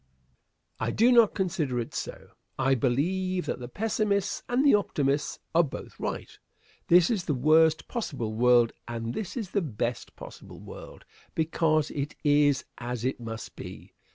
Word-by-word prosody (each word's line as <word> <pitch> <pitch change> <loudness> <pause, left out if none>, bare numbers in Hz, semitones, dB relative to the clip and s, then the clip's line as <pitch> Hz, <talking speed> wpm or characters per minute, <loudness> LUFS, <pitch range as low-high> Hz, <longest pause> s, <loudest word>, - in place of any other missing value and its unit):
Answer. 110 - -1
I - - 0
do 235 +3 +5
not 235 -4 +5
consider 160 - -1
it 115 - -5
so. - - -6 0.3
I 135 0 +2
believe 180 +9 0
that - - -3
the 120 - -6
pessimists 205 - -1
and 250 +4 +2
the 285 - +6
optimists 145 -8 +1 0.2
are 170 - +6
both 150 - -8
right. - - -5 0.5
This 175 +2 +5
is 200 -6 -1
the 150 - 0
worst 155 +4 +4
possible 135 - -3
world, 120 0 +4
and 115 0 -4
this 205 +1 -5
is 210 -6 -4
the 200 - +1
best 120 - -3
possible - - -11
world - - -11 0.3
because 160 -1 +1
it 145 0 -4
is 145 -2 +3
as 120 -1 -4
it 130 - -1
must 115 -1 -7
be. - - -10
155 Hz, 160 wpm, -27 LUFS, 125-190 Hz, 0.5 s, the